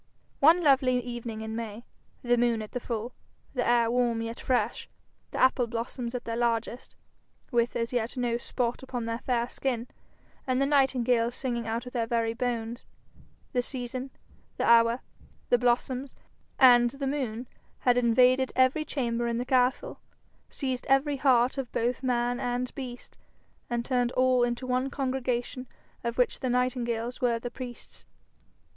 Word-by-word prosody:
One 330 +5 +6
lovely 260 -3 +4
evening 240 -2 -6
in 220 0 -5
May, 230 0 -6 0.4
the 245 0 +3
moon 235 -2 +1
at 215 - -10
the 250 - -3
full, 235 0 -4 0.4
the 250 -2 0
air 235 -1 +3
warm 240 -2 +1
yet 230 +1 -5
fresh, 255 -1 -1 0.4
the - - -6
apple 260 -1 +3
blossoms 235 +1 -4
at 245 - -4
their 230 - -3
largest, 235 +1 -2 0.6
with 235 0 +1
as 230 +1 -2
yet 240 +1 -1
no 240 -1 0
spot 240 0 -2
upon 250 -3 -4
their 230 0 -3
fair 240 -2 0
skin, 250 -2 -3 0.6
and 255 0 +1
the 275 - +3
nightingales 250 -4 +2
singing 235 -4 -2
out 230 +2 -2
of 250 - -9
their 230 -2 -1
very 230 -1 0
bones, 235 -1 -3 0.7
the 250 - +2
season, 255 +1 -5 0.5
the - - 0
hour, 230 +1 +5 0.5
the 245 - +4
blossoms, 250 +2 0 0.4
and 240 -2 +7
the 275 +3 -5
moon 255 -4 -2 0.3
had 245 -1 +4
invaded 250 +2 +4
every 260 +4 +3
chamber 240 -5 -2
in 235 0 -1
the 245 - -2
castle, 255 - +1 0.5
seized 260 -3 -3
every 275 +1 +3
heart 255 -1 +3
of 255 -3 -4
both 240 +2 -1
man 245 -1 0
and 250 -1 -2
beast, 250 -3 -8 0.5
and 235 -1 -1
turned 245 -2 +1
all 255 -1 +3
into 240 +1 -1
one 255 +1 0
congregation 255 -2 -2 0.4
of 235 0 -3
which 250 - +2
the 260 - -2
nightingales 245 -1 -1
were 240 -2 +2
the 240 +1 -6
priests. 245 -1 -9
245 Hz, 160 wpm, -28 LUFS, 235-255 Hz, 0.7 s, and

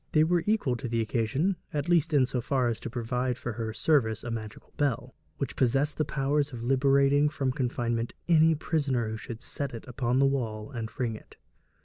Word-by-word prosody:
They 155 - +6
were 175 +2 +2
equal 205 - +2
to 125 - -5
the 115 0 -1
occasion, 120 - 0
at 145 -1 -2
least 170 -2 +3
in 140 -4 +4
so 125 -1 -2
far 130 0 +1
as 115 - -2
to - - -5
provide 125 +1 -2
for 120 - -4
her 110 0 -3
service 110 -3 +1
a 120 - -4
magical 110 -2 -7
bell, 130 -3 -1 0.2
which 140 - -3
possessed 135 +4 +1
the 155 - +2
power 135 +2 0
of 135 -5 -2
liberating 140 +3 +4
from 140 -4 -1
confinement 120 -2 -1
any 160 -1 +5
prisoner 140 -7 0
who 110 - -4
should 115 +1 -8
set 140 -4 -4
it 115 - -9
up 125 +1 -11
on 120 +1 +2
the 135 - +5
wall 115 -5 -1
and 115 -4 -4
ring 120 -3 0
it. - - -14
130 Hz, 210 wpm, -28 LUFS, 115-145 Hz, 0.2 s, They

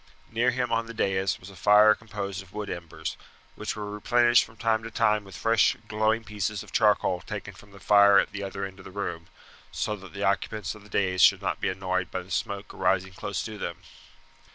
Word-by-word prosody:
Near 120 +2 +2
him 125 0 -1
on 115 0 0
the 115 - -8
dais 95 -3 0
was 90 +2 -11
a - - -14
fire 105 +4 +6
composed 100 -4 -6
of 95 -2 -17
wood 105 -1 -4
embers, 80 -2 -6 0.4
which - - -4
were 105 -1 -5
replenished 120 +3 +4
from 110 - -15
time 110 0 +1
to 115 - -7
time 105 -1 +2
with 95 -3 -11
fresh 115 -1 +3
glowing 110 +1 +1
pieces 105 -2 -3
of - - -15
charcoal 105 -5 +2
taken 80 - -7
from 105 - -16
the 100 0 -15
fire 100 -1 +6
at - - +3
the 100 - -6
other 100 0 -4
end 95 0 -10
of 95 - -13
the - - -8
room, 90 -4 -5 0.4
so 105 - -2
that 95 -2 -13
the 100 0 -4
occupants 100 +2 -1
of 105 - -13
the 105 - -17
dais 95 -2 +1
should - - +6
not - - -2
be - - +1
annoyed 95 -1 -2
by 95 - -4
the 95 - -16
smoke 100 +3 -3
arising 95 +1 0
close 100 +1 -4
to 110 -2 -7
them. 85 -1 -5
100 Hz, 225 wpm, -27 LUFS, 95-110 Hz, 0.4 s, fire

